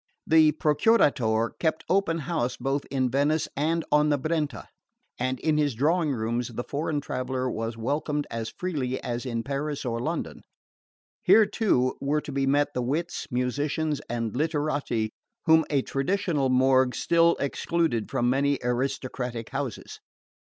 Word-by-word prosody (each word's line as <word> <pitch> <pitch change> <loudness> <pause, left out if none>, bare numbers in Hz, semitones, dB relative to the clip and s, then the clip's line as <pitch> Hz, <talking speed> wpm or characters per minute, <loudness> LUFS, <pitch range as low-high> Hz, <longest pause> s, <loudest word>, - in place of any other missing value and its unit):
The 155 -1 +5
Procuratore 145 - +2
kept 160 -1 0
open 185 -3 +2
house 125 -8 -1
both 135 +1 -1
in 130 -2 0
Venice 145 +4 +1
and 160 +3 0
on 150 0 +4
the 145 - +3
Brenta, 150 -5 -2 0.5
and 130 +1 -1
in 155 -1 +2
his 145 -5 +1
drawing 155 +5 +2
rooms 120 0 -1
the 120 0 -5
foreign 145 +2 -2
traveller 130 -1 -3
was 115 +1 -4
welcomed 145 +4 -1
as 115 -1 -3
freely 140 -8 -3
as 120 +2 -3
in 115 -2 -2
Paris 140 +2 -3
or 115 -1 -1
London. 160 +8 -3 0.8
Here, 220 - +6
too, 160 - +1
were 145 +2 +1
to 145 - -7
be 135 0 0
met 145 +1 +2
the 125 - -1
wits, 155 +8 -2
musicians 145 +4 -1
and 115 -2 -2
literati 145 -7 -1 0.3
whom 160 -1 +5
a 140 -3 +1
traditional 150 -1 0
morgue 130 0 +3
still 170 0 +3
excluded 140 -3 -1
from 120 - 0
many 140 +2 +2
aristocratic 125 -1 -2
houses. 135 -5 -5
140 Hz, 145 wpm, -26 LUFS, 125-155 Hz, 0.8 s, Here